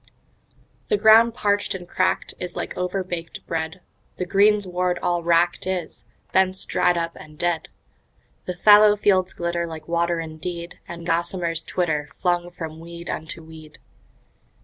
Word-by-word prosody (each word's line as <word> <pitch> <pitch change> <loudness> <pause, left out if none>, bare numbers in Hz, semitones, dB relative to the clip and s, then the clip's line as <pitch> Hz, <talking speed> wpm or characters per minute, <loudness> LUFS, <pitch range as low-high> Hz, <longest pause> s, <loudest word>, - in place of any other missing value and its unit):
The 425 - +2
ground 225 - +6
parched 205 -2 0
and 180 -2 -8
cracked 185 - 0
is 180 -1 -6
like - - -4
overbaked 180 -2 -4
bread, 160 +2 -3 0.4
The 180 - -2
greensward 185 -2 +2
all 175 -1 +1
wracked 170 +2 +2
is, 185 -2 -4 0.3
bents 190 0 +2
dried 180 -1 +2
up 170 0 -2
and 155 0 -13
dead. 175 -1 -1 0.8
The 180 - -4
fallow 210 +2 +7
fields 190 -3 +2
glitter 170 0 -2
like 160 -2 -8
water 170 0 +1
indeed, 170 +2 -6
And 170 -1 -8
gossamers 170 0 0
twitter, 155 -5 -1
flung 175 -1 0
from 160 -3 -7
weed 170 +1 -7
unto 160 +1 -6
weed. 160 -1 -13
175 Hz, 140 wpm, -23 LUFS, 165-185 Hz, 0.8 s, fallow